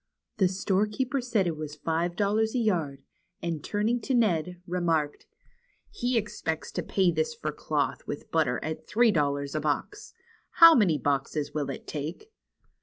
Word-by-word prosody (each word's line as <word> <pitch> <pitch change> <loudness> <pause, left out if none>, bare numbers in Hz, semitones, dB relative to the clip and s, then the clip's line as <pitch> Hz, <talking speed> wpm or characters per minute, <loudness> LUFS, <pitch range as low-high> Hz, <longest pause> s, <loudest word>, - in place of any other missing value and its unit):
The 190 - +4
storekeeper 210 +8 0
said 235 -6 +1
it 170 -2 -1
was 150 -1 -6
five 165 +3 -1
dol 205 +1 +1
lars 220 +2 +1
a - - +2
yard, 170 - 0 0.4
and 165 -4 -3
turning 220 +4 0
to 260 +4 -1
Ned, 180 -6 +1
remarked: 165 -4 -1 0.6
"He 245 - 0
expects 205 -7 -3
to - - -2
pay 190 -3 +2
this 470 - -1
for 470 - -3
cloth - - -2
with - - -6
butter - - +1
at - - -5
three 230 +1 +4
dollars 140 -4 0
a 155 - 0
box. 155 - -3 0.4
How 330 -1 +9
many 195 - +4
boxes 145 +1 -1
will 145 -2 -2
it 135 - -6
take 160 - -6
180 Hz, 165 wpm, -28 LUFS, 155-220 Hz, 0.6 s, How